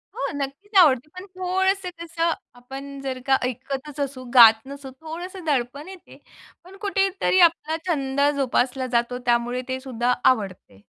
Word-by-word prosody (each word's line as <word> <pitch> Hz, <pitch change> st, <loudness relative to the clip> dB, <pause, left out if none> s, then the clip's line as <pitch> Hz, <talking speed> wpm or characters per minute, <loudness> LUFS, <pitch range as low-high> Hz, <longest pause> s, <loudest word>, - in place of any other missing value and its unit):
हो -, -, -2 dB
नक्कीच 285 Hz, +10 st, -6 dB
आवडते. 290 Hz, -4 st, +4 dB
पण 365 Hz, +1 st, -8 dB
थोडंसं 375 Hz, +1 st, 0 dB
कसं 335 Hz, 0 st, -1 dB, 0.2 s
आपण 275 Hz, +3 st, -9 dB
जर 260 Hz, -2 st, -4 dB
का 265 Hz, 0 st, +5 dB
ऐकतच 270 Hz, +4 st, -5 dB
असू, 270 Hz, -2 st, -3 dB
गात 225 Hz, -3 st, +8 dB
नसू 280 Hz, -1 st, -9 dB
थोडंसं 350 Hz, +3 st, -7 dB
दडपण 280 Hz, +2 st, -1 dB
येते, 380 Hz, -2 st, -13 dB, 0.5 s
पण 380 Hz, +2 st, -14 dB
कुठेतरी 390 Hz, -2 st, +1 dB
आपला 320 Hz, -1 st, -5 dB
छंद 275 Hz, -4 st, -1 dB
जोपासला 260 Hz, -1 st, 0 dB
जातो, 240 Hz, +1 st, -1 dB
त्यामुळे 240 Hz, +1 st, +1 dB
ते 260 Hz, 0 st, -3 dB
सुद्धा 250 Hz, -2 st, -1 dB
आवडते. 190 Hz, -, 0 dB
275 Hz, 140 wpm, -23 LUFS, 255-340 Hz, 0.5 s, गात